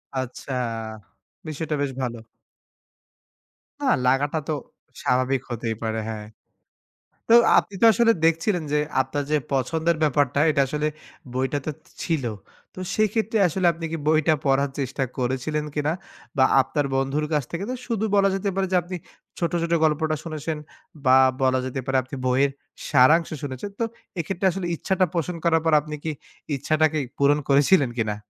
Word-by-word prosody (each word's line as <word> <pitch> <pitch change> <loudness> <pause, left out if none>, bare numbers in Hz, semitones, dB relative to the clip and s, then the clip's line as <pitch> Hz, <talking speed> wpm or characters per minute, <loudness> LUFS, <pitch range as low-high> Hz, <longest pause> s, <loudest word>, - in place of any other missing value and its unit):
আচ্ছা, 130 +1 -5 1.0
বিষয়টা 155 0 -3
বেশ 140 -1 -1
ভালো। 120 -2 -3 1.6
না - - -2 0.2
লাগাটা 145 +4 +2
তো 155 - 0 0.5
স্বাভাবিক 130 +1 +1
হতেই 115 -1 -3
পারে। 110 0 -1
হ্যাঁ। 105 -1 -5 1.0
তো - - +6 0.2
আপনি - - +1
তো - - +7
আসলে 230 +1 +4
দেখছিলেন 165 +2 +2
যে 150 - +3 0.2
আপনার 140 +2 -3
যে 155 - +4 0.2
পছন্দের 160 +5 +1
ব্যাপারটা 145 -2 +2
এটা 140 - +2
আসলে 150 +3 -1 0.5
বইটাতে 135 +3 -2 0.3
ছিল। 160 -6 -1 0.5
তো - - -10 0.2
সেইক্ষেত্রে 215 +1 +1
আসলে 180 +2 -1
আপনি 165 0 -6
কি 165 - -2
বইটা 155 0 +4
পড়ার 140 +1 +2
চেষ্টা 135 0 -1
করেছিলেন 130 +4 -1
কিনা? 150 0 0 0.5
বা 130 - +5 0.2
আপনার 135 +2 -1
বন্ধুর 135 +3 0
কাছ 150 -2 +2
থেকে 170 +3 -3
তো - - -1
শুধু 225 -3 0
বলা 195 0 +4
যেতে 195 +1 -1
পারে 195 0 0
যে - - +2
আপনি 180 +2 -7 0.4
ছোট, 170 - 0
ছোট 170 0 0
গল্পটা 155 0 +2
শুনেছেন 155 -1 -4 0.5
বা 130 0 +7 0.2
বলা 130 0 +3
যেতে 130 +1 -3
পারে 135 -1 +1
আপনি 130 +2 -8
বইয়ের 130 +2 +3 0.4
সারাংশ 155 +4 +5
শুনেছেন। 135 +7 -5
তো - - +1 0.4
এক্ষেত্রে 185 +3 -2
আসলে 185 0 -4
ইচ্ছাটা 185 +3 +1
পোষণ 170 +1 -1
করার 165 -1 +3
পর 160 - +3
আপনি 150 +1 -6
কি 160 - -1 0.4
ইচ্ছাটাকে 155 +2 +1 0.2
পূরণ 145 +1 +4
করেছিলেন 140 +1 +4
কিনা? 110 -3 0
150 Hz, 155 wpm, -24 LUFS, 135-165 Hz, 1.6 s, তো